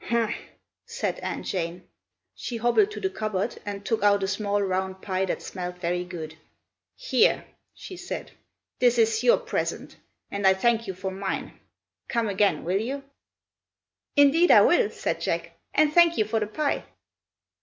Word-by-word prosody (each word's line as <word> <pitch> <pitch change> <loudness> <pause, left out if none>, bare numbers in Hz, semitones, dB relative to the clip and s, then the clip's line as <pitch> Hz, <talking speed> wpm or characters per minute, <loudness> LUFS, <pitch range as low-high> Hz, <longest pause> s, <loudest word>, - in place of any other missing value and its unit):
"Humph!" 230 -2 +1 0.5
said 465 +1 -3
Aunt - - -4
Jane. 175 0 -3 0.5
She 240 - -5
hobbled 240 - +3
to 430 - -7
the 385 - 0
cupboard 215 0 -2
and 200 0 -5
took 225 - 0
out 200 -1 +4
a - - 0
small 205 +1 0
round 190 -1 -1
pie 190 -1 0
that 185 - -3
smelt 180 -1 -6
very 180 0 -1
good. 160 -3 -8 0.6
"Here!" - - +2 0.3
she 370 - -9
said. 370 +1 -6 0.5
"This 245 -1 +4
is 225 0 +2
your 245 - +6
present, - - -4 0.3
and 200 -1 +1
I 190 - +6
thank 230 +3 +1
you 190 - -4
for 190 +1 -4
mine. 190 0 -4 0.5
Come 235 -3 0
again, 195 -5 +1
will 185 +4 0
you?" 275 +5 -4 1.1
"Indeed 285 +5 +5
I - - +8
will!" 465 -4 +4
said - - -3
Jack, - - -2 0.2
"and 305 -1 +3
thank 340 0 +5
you 215 - +3
for 220 +1 0
the 210 - -2
pie!" 285 +7 -1
210 Hz, 165 wpm, -26 LUFS, 190-245 Hz, 1.1 s, I